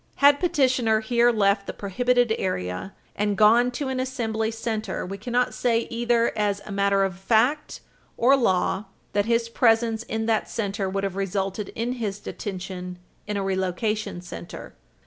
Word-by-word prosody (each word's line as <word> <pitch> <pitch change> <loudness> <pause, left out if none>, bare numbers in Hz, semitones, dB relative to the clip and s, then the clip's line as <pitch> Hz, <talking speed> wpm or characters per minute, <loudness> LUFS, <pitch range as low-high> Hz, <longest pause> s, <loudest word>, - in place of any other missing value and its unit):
Had 285 0 +5
petitioner 255 -10 +2
here 235 +2 +3
left 200 -2 +2
the - - -4
prohibited 245 +4 +1
area 90 - -3 0.2
and 205 -1 0
gone 230 +4 +5
to 265 +3 -4
an 260 -1 -2
assembly 225 -4 -1
center, 220 -3 -3
we 195 +2 -6
cannot 245 +3 0
say, 235 -2 +1
either 235 0 +1
as 205 -1 0
a - - -8
matter 200 0 +2
of 185 -2 -2
fact 245 +9 +1 0.4
or 260 +4 +5
law, 195 -4 +1 0.3
that 205 0 +2
his 230 0 +1
presence 230 -1 +2
in 225 -1 -3
that 220 -1 0
center 200 -3 -2
would 195 +1 -2
have 195 -2 -2
resulted 195 +1 -2
in 235 +2 -1
his 205 -2 -2
detention 185 -3 -6 0.3
in 210 -1 -2
a 200 - -1
relocation 195 +1 -2
center. 175 -1 -9
220 Hz, 160 wpm, -25 LUFS, 195-240 Hz, 0.4 s, Had